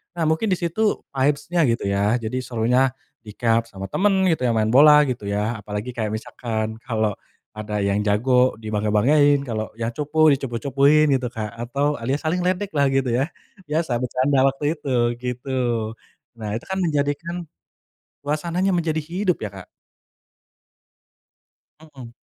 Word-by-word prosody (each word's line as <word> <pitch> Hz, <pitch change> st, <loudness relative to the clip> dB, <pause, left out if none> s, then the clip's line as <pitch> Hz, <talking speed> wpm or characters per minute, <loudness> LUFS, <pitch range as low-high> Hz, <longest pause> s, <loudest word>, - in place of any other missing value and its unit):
Nah, 170 Hz, -, -1 dB
mungkin 160 Hz, +8 st, +1 dB
di -, -, 0 dB
situ 205 Hz, +5 st, 0 dB
vibes-nya 145 Hz, +5 st, 0 dB
gitu 115 Hz, -2 st, 0 dB
ya, 100 Hz, +3 st, +2 dB
jadi 115 Hz, +3 st, -3 dB
serunya 125 Hz, +2 st, +1 dB, 0.3 s
dicup 115 Hz, +2 st, 0 dB
sama 95 Hz, -3 st, -8 dB
temen 200 Hz, -, +2 dB, 0.2 s
gitu 160 Hz, -6 st, 0 dB
ya, 120 Hz, -, +2 dB
main 110 Hz, -1 st, +1 dB
bola 150 Hz, +4 st, +7 dB
gitu 120 Hz, -5 st, -4 dB
ya, 105 Hz, +3 st, -1 dB
apalagi 105 Hz, +3 st, -5 dB
kayak 110 Hz, -2 st, -2 dB
misalkan 110 Hz, 0 st, -4 dB
kalo 110 Hz, -4 st, -1 dB, 0.4 s
ada 105 Hz, -1 st, -4 dB
yang 100 Hz, +1 st, 0 dB
jago 125 Hz, +5 st, +3 dB
dibangga-banggain, 110 Hz, +8 st, +3 dB
kalo 110 Hz, -2 st, -3 dB
yang 115 Hz, 0 st, -1 dB
cupu, 155 Hz, +1 st, +2 dB
dicupu-cupuin 140 Hz, +4 st, +2 dB
gitu, 130 Hz, -1 st, -1 dB
Kak, 110 Hz, -2 st, -4 dB, 0.2 s
atau 145 Hz, +4 st, 0 dB
alias 130 Hz, +5 st, -2 dB
saling 170 Hz, +3 st, 0 dB
ledek 185 Hz, +2 st, 0 dB
lah 140 Hz, -1 st, +3 dB
gitu 135 Hz, -1 st, +1 dB
ya, 125 Hz, +4 st, +1 dB, 0.4 s
biasa 150 Hz, -4 st, 0 dB
bercanda 130 Hz, +2 st, +1 dB
waktu 145 Hz, +3 st, -1 dB
itu 140 Hz, -, -5 dB, 0.3 s
gitu. 125 Hz, +2 st, -4 dB, 0.9 s
Nah, 105 Hz, -2 st, -4 dB
itu 115 Hz, -, -6 dB
kan 190 Hz, -, -3 dB
menjadikan 150 Hz, +1 st, -1 dB, 0.9 s
suasananya 170 Hz, +6 st, -1 dB
menjadi 165 Hz, -2 st, 0 dB
hidup 180 Hz, +4 st, -1 dB
ya, 105 Hz, -, -3 dB
Kak. 95 Hz, -2 st, -10 dB, 2.1 s
Mhm, 135 Hz, -7 st, -13 dB
130 Hz, 145 wpm, -22 LUFS, 110-150 Hz, 2.1 s, bola